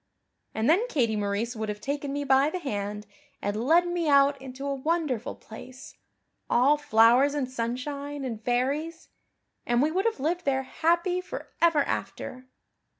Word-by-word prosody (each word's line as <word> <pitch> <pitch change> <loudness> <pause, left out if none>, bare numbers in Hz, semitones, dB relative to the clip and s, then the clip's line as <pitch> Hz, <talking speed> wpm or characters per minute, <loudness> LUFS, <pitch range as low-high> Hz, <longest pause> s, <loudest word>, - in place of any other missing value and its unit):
And 220 +2 0
then 385 +10 +4
Katie 240 - +1
Maurice 210 +4 -2
would 220 -1 -4
have 210 0 -4
taken 280 +3 -3
me 285 +1 -2
by 270 +1 +4
the 365 - -3
hand 210 - -4 0.3
and 210 +3 -2
led 345 +3 +5
me 345 -3 -1
out 280 -1 +4
into 265 +1 -8
a 280 - -1
wonderful 275 -4 -1
place, 255 +4 -12 0.5
all 265 +5 +4
flowers 255 +1 +4
and 280 -3 -1
sunshine 270 +4 -4
and 225 -3 -5
fairies, 280 +8 -1 0.5
and 240 0 +1
we 300 +4 +2
would 380 +5 0
have 455 -9 0
lived 340 +6 -1
there 265 -1 0
happy 345 +6 +1
for - - -8
ever 330 -4 +4
after. 255 -2 -5
275 Hz, 160 wpm, -27 LUFS, 240-310 Hz, 0.5 s, led